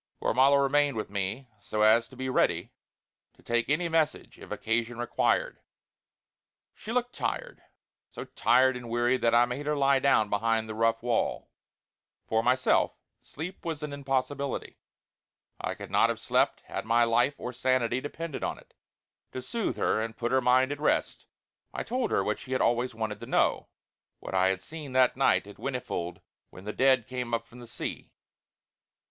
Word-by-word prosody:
Gormala 135 +4 +4
remained 140 -1 +2
with 105 - -4
me 100 +6 -3
so 105 +1 -1
as 115 +2 +5
to - - -15
be 130 +1 -4
ready 130 - +1 0.6
to - - -23
take 120 +1 0
any 170 +4 +1
message 160 -2 -1
if - - -12
occasion 115 +1 -1
required. 120 0 0 1.1
She 220 - -8
looked 245 0 -1
tired, - - -4 0.5
so - - -8
tired 130 +1 +3
and 120 -1 -7
weary 120 +2 +2
that 115 -2 +2
I 120 +1 +6
made 130 +4 -5
her 150 - +1
lie 140 -1 +3
down 130 -6 +3
behind 110 +2 0
the 110 - -5
rough 115 +1 +1
wall. 120 -2 -1 0.7
For 110 0 +1
myself 125 +2 +2 0.3
sleep 165 +6 -8
was 160 -3 -4
an 150 -1 -4
impossibility; 140 0 -3 0.8
I - - -3
could - - -10
not - - +4
have - - -2
slept - - +1
had - - -5
my 115 +1 +3
life 120 +4 +2
or 125 - -6
sanity 130 -1 +1
depended 155 +1 -5
on - - -2
it. - - -19 0.6
To - - -4
soothe, 195 - -2
her 110 - +1
and 115 0 -5
put 120 0 -2
her 130 0 +3
mind 130 +2 +3
at 145 - -4
rest, 150 - 0 0.5
I - - -2
told 250 +1 -1
her 95 - +1
what 105 +2 -1
she 130 - -6
had 130 - +1
always 120 0 +1
wanted 110 -2 -3
to - - -9
know; - - +1 0.5
what - - -8
I 95 0 +3
had 95 0 -1
seen 155 -4 -8
that 130 -1 +4
night 135 -5 +3
at 100 - -12
Whinnyfold 95 -9 -4 0.3
when 90 - -13
the 105 +1 -5
Dead 130 -3 +3
came 125 -1 -3
up 115 0 -4
from 120 +2 -15
the 120 - -11
sea. - - -6
125 Hz, 180 wpm, -28 LUFS, 115-140 Hz, 1.1 s, I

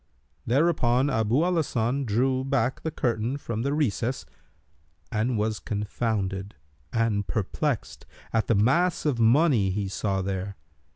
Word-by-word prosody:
Thereupon 135 -1 +2
Abu 115 +4 +2
al 180 0 +1
Hasan 135 -2 0
drew 130 +4 +1
back 130 -2 0
the 160 - -2
curtain 120 -2 -1
from 115 -5 -4
the 140 +3 0
recess 130 -4 -1 0.9
and 110 +2 0
was 105 0 -1
confounded 100 -3 -2 0.4
and 115 -3 0
perplexed 120 - -2 0.3
at 115 -1 +1
the 115 - +3
mass 160 - +2
of 140 -6 +1
money 115 - +4
he 100 +1 -2
saw 95 0 -1
there. 95 +1 -3
115 Hz, 130 wpm, -26 LUFS, 105-135 Hz, 0.9 s, money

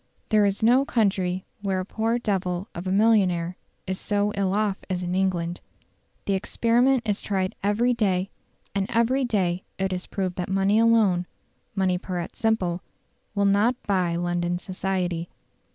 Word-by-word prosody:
There 210 -2 +4
is 200 +2 -2
no 245 +4 +5
country 190 -7 0 0.2
where 195 -2 0
a 185 - -3
"poor 225 +3 0
devil 190 -5 -1
of 175 +2 -6
a - - 0
millionaire 190 -5 +3 0.3
is 190 0 -3
so 205 0 0
ill 195 -1 0
off 210 -2 0
as 180 -1 -2
in 175 0 -2
England". 180 -2 0 0.6
The 200 - +1
experiment 235 +5 +2
is 205 -1 0
tried 190 -2 -1
every 220 +5 +2
day, 195 -5 0 0.4
and 195 -1 0
every 235 +3 +2
day 185 -6 0
it 190 0 -1
is 180 0 -4
proved 185 -3 -3
that 180 -1 -3
money 195 +2 +3
alone 215 -6 +3 0.5
money 185 -2 +1
pur 185 0 -4
et 170 - -5
simple 185 -6 0 0.5
will 200 0 +2
not 205 +5 +3
buy 180 -4 +1
"London 175 0 -1
Society". 180 -2 -2
195 Hz, 160 wpm, -25 LUFS, 180-215 Hz, 0.6 s, no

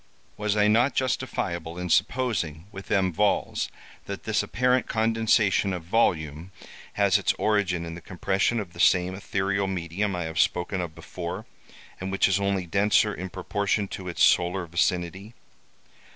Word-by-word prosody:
Was 105 0 -1
I 105 0 +4
not 120 +6 +3
justifiable 90 -10 -2
in 90 0 -3
supposing 90 - 0
with 95 -1 -10
M. 95 -3 +2
Valz, 105 +5 0 0.4
that - - -6
this - - +1
apparent 125 +2 +1
condensation 110 -3 +2
of 90 -2 -5
volume 80 -4 0 0.4
has - - +3
its - - +1
origin 95 -5 0
in 85 - -6
the 85 - -9
compression 95 +6 0
of 95 -5 -6
the 85 - -13
same 90 +1 +4
ethereal 100 0 -1
medium 95 +2 -2
I 90 - -2
have 80 +1 -4
spoken 90 +1 +1
of 85 -3 -6
before, 85 +1 -6 0.5
and 95 +1 -4
which 95 - +3
is 95 0 +2
only 100 -2 0
denser 105 +3 +2
in 95 0 -6
proportion 100 +2 -1
to 95 - -7
its 85 - 0
solar 90 +1 +3
vicinity? 90 +4 -1
95 Hz, 155 wpm, -26 LUFS, 85-105 Hz, 0.5 s, I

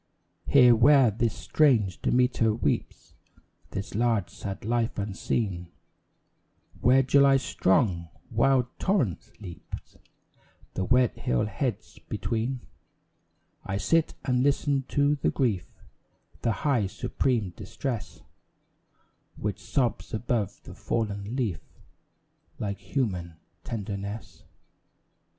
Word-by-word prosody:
Here, 125 -4 +7
where 130 0 +6
this 115 +1 -1
strange 115 -12 +2
Demeter 125 -3 +2
weeps - - -2 0.6
This 95 - -5
large, 110 -5 +1
sad 100 0 -6
life 115 0 0
unseen 100 -2 -2 1.1
Where 130 +3 +5
July's 135 0 +5
strong, 90 -3 +1 0.2
wild 135 -3 +3
torrent 160 - 0
leaps 90 -5 -10 0.8
The 95 - -2
wet 125 +1 +3
hill 60 -1 +1
heads 120 +1 -4
between, 120 +3 -2 1.0
I 95 0 -3
sit 165 +9 +1
and 125 -2 +2
listen 140 0 +1
to 145 +1 +2
the - - +1
grief, 110 -10 0 0.7
The 115 - +1
high, 125 -9 +2
supreme 110 0 -1
distress, 110 +5 -5 1.1
Which 105 -2 -3
sobs 120 -5 -1
above 110 -2 -2
the - - -10
fallen 105 0 -3
leaf 110 - -1 1.0
Like 100 -1 -3
human 95 - -2 0.3
tenderness! 100 -1 -6
115 Hz, 100 wpm, -27 LUFS, 100-130 Hz, 1.1 s, Here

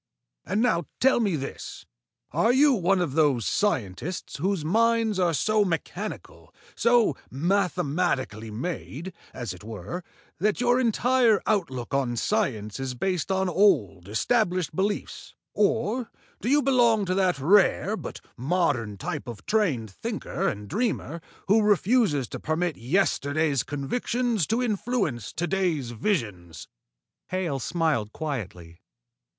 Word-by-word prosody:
And 215 +4 +1
now 175 -9 +2
tell 265 -1 +4
me 205 -7 +1
this: 135 -2 -6 0.5
are 225 - +3
you 280 +2 +5
one 190 -3 +2
of 155 -7 -1
those 145 -7 +2
scientists 150 - -1
whose 180 0 -1
minds 225 +2 +2
are 175 -2 +3
so 215 +8 +2
mechanical, 170 -4 -5 0.2
so 235 - +3
mathematically 155 - 0
made, 165 - -5 0.2
as 120 -7 -5
it 90 - -13
were, 110 - -6 0.4
that 210 +4 +1
your 245 0 +3
entire 240 -2 +3
outlook 140 - -1
on 130 -3 0
science 115 - -1
is 130 -1 -3
based 185 +5 -1
on 190 0 +1
old, 105 - +2
established 180 - +1
beliefs, 200 +3 -3 0.2
or 225 +3 +1 0.3
do 235 - -1
you 290 +1 +4
belong 235 -6 +3
to 185 - 0
that 185 -3 +2
rare 195 +6 +3
but - - -7
modern 130 - 0
type 135 +7 -5
of 115 -4 -8
trained 155 - 0
thinker - - -3
and 105 0 -3
dreamer 180 - -2 0.3
who 215 +3 +5
refuse 205 - +2
to - - -6
permit 160 +1 -1
yesterday's 145 0 +1
convictions 215 - -1
to 235 +3 +1
influence 205 - -1
to 170 - -1
day's 175 -10 -1
visions?" 110 - -3 0.6
Hale 175 -7 -2
smiled 150 - 0
quietly. 95 - -5
175 Hz, 130 wpm, -26 LUFS, 130-210 Hz, 0.6 s, you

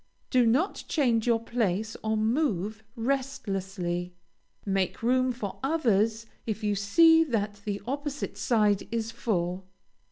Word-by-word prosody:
Do 250 -3 +4
not 285 - +1
change 245 -7 +1
your 230 -1 +3
place 220 -2 -1
or 220 0 0
move 220 - 0
restlessly. 195 -9 -2 0.5
Make 195 +1 -1
room 255 +2 +3
for 220 -5 -6
others 225 -7 +1 0.2
if 220 0 -3
you 210 -1 +1
see 325 +12 +5
that 210 -6 -2
the 205 -1 -3
opposite 285 +2 -4
side 210 -4 +2
is 230 -1 -2
full. 185 -6 -2
225 Hz, 125 wpm, -28 LUFS, 200-255 Hz, 0.5 s, see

